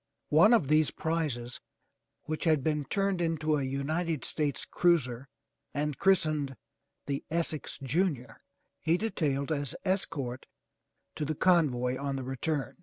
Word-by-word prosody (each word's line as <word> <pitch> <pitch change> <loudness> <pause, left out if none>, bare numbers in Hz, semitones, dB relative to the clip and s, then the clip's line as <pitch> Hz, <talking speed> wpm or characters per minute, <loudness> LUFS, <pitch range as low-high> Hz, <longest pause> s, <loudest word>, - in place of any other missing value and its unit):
One 165 +9 +6
of 230 - +4
these 155 +1 +4
prizes 150 -7 -2 0.6
which 155 +2 -3
had 155 -4 +3
been 150 -1 0
turned 195 -1 0
into 155 -2 +1
a 140 - -1
United 150 +4 -1
States 150 -3 -2
cruiser 135 -8 +1 0.5
and 145 -1 -1
christened 155 - +2 0.5
The 140 -1 -2
Essex 160 -2 -1
Junior, 140 -4 -1 0.4
he 165 +3 +2
detailed 150 -9 -1
as 145 -3 -1
escort 150 -10 -2 0.7
to - - -4
the 155 +1 -2
convoy 130 -8 +2
on 140 -1 -2
the 135 - -3
return. 135 +3 -2
150 Hz, 130 wpm, -30 LUFS, 135-165 Hz, 0.7 s, One